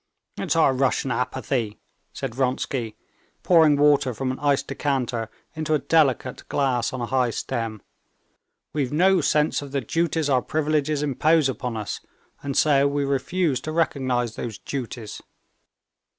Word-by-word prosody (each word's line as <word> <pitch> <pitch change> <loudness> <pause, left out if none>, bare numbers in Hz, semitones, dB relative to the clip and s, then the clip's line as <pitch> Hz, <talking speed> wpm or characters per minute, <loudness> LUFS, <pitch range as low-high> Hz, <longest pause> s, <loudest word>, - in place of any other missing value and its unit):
"It's - - 0
our 160 -5 +4
Russian 135 0 +1
apathy," 125 -2 -2 0.3
said 135 -4 -5
Vronsky, 130 -2 -1 0.5
pouring 160 -4 +5
water 145 -4 +3
from 130 +2 -2
an 130 - -6
iced 145 -1 +1
decanter 125 -5 -2 0.2
into 155 -1 0
a - - +4
delicate 140 -5 +1
glass 130 -2 +1
on 130 -2 -5
a - - -1
high 130 0 +1
stem; 115 -2 -4 0.9
"we've 140 -4 -1
no 180 +4 +4
sense 150 +1 +2
of 140 -1 -9
the 140 - 0
duties 160 +4 0
our 130 -3 +3
privileges 150 -1 0
impose 150 +2 +3
upon 125 -3 -3
us, 105 -3 -4 0.4
and 140 -1 -3
so 140 -2 +4
we 140 0 0
refuse 140 +1 0
to 155 - -5
recognize 130 -7 0
these 115 -3 -5
duties." 120 -5 -6
135 Hz, 145 wpm, -24 LUFS, 125-150 Hz, 0.9 s, pouring